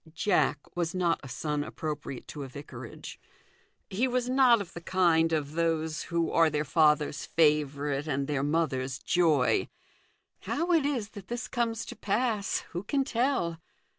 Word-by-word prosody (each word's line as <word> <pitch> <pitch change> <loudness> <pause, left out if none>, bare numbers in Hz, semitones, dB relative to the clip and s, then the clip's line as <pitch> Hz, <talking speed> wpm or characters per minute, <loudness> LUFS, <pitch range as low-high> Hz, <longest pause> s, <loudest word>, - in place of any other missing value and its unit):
Jack 155 -6 +1
was 175 0 -1
not 175 -2 +1
a 135 - -10
son 150 +2 -2
appropriate 150 -4 -5
to 150 - -7
a 135 - -5
vicarage: 130 -3 -9 0.7
he 225 +7 0
was 250 -1 0
not 255 -2 +5
of 200 -4 -7
the 170 - -7
kind 165 -3 +3
of 150 -2 -1
those 160 -1 0
who 170 -1 0
are 165 -1 +4
their 150 0 -1
father's 150 -1 +2
favourite 150 -2 +1
and 140 -2 -1
their 145 -3 0
mother's 135 -4 0
joy. 155 -3 +2 0.7
How 335 +4 -1
it 320 -5 +4
is 240 -8 -2
that 200 -3 -11
this 240 +1 -4
comes 230 -2 -1
to - - -8
pass, 215 0 0
who 175 - -3
can 275 +7 0
tell 235 - 0
165 Hz, 160 wpm, -29 LUFS, 150-210 Hz, 0.7 s, not